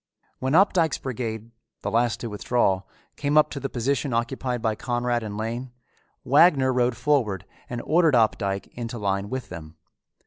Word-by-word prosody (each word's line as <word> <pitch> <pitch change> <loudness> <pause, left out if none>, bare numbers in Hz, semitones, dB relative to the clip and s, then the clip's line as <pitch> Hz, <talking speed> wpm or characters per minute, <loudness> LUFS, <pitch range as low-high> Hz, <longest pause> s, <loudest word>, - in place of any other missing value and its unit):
When 130 +2 -1
Opdycke's 175 -4 +4
brigade, 115 -3 -5 0.3
the 100 - -2
last 115 +1 +1
to 120 - -3
withdraw, 105 -2 +1 0.4
came 145 +1 +1
up 155 - +5
to 140 - -4
the 135 - -4
position 130 +2 -1
occupied 125 +1 -1
by 110 -1 0
Conrad 120 +1 -1
and 105 -2 -6
Lane, 120 +3 -4 0.5
Wagner 140 -2 +5
rode 125 -1 +1
forward 110 - +1 0.2
and 120 -1 -4
ordered 160 -3 +3
Opdycke 100 -4 +1
into 120 0 -5
line 100 -1 -1
with 130 0 -5
them. 80 -2 -9
120 Hz, 160 wpm, -25 LUFS, 110-135 Hz, 0.5 s, up